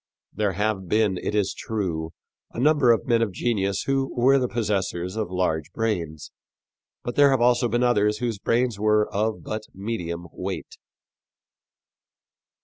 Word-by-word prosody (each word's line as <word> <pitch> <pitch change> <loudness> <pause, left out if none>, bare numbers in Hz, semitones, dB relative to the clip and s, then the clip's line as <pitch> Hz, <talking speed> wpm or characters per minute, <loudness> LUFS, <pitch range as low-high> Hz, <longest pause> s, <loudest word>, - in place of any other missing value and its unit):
There 105 -2 0
have 100 -1 -1
been, 105 -3 +2
it 105 - -3
is 105 -2 +1
true, 90 -8 -3 0.4
a - - -5
number 145 -2 +4
of 115 - +1
men 115 -2 +2
of 115 -3 0
genius 100 -1 -1
who 135 -1 0
were 135 +3 +5
the 125 - 0
possessors 95 -5 -2
of 110 -4 -2
large 90 -4 -1
brains, 85 -9 -3 0.7
but 120 - -4
there 145 -1 +6
have 135 -2 +2
also 120 0 +3
been 120 +2 0
others 105 -3 +2
whose 115 -3 -2
brains 115 -1 0
were 105 0 +3
of 110 +2 -1
but 110 0 -4
medium 90 -5 -4
weight. - - -5
105 Hz, 150 wpm, -24 LUFS, 95-120 Hz, 0.7 s, there